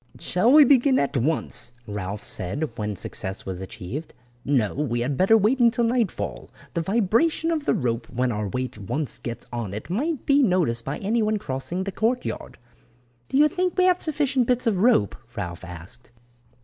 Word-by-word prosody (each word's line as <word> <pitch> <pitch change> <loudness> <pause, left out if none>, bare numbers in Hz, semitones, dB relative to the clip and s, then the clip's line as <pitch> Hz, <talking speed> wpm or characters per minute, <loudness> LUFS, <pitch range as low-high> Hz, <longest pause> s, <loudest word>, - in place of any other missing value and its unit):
"Shall 215 +7 +2
we 300 +1 +9
begin 265 0 +4
at 140 +1 0
once?" 135 -2 0
Ralph 105 -1 -5
said, 120 - -2
when 105 -2 -3
success 95 +1 -2
was 95 -1 -5
achieved. 105 - -7 0.3
"No, 125 -8 +1
we 120 -5 -1
had 135 +3 -1
better 195 +9 +5
wait 220 +6 +2
until 235 0 +4
nightfall. 225 - -1 0.2
The 170 - 0
vibration 230 - +1
of 310 -3 -1
the - - +2
rope 120 -2 -2
when 125 +1 0
our 105 -1 -2
weight 125 +1 -4
once 140 +9 -2
gets 120 -1 -6
on 110 -5 -4
it 110 +10 -7
might 290 - -1
be 285 0 +4
noticed 175 - +2
by 135 - -3
anyone 215 +1 0
crossing 150 +3 -3
the 195 - -4
courtyard." 230 +6 -2 0.7
"Do - - 0
you 300 +1 +7
think 365 +4 -1
we 370 - +4
have 365 -1 +3
sufficient 280 -5 +1
bits 250 0 +1
of 220 -5 +2
rope," 185 - +3 0.2
Ralph 85 -4 -5
asked. 90 +8 -9
165 Hz, 175 wpm, -24 LUFS, -, 0.7 s, we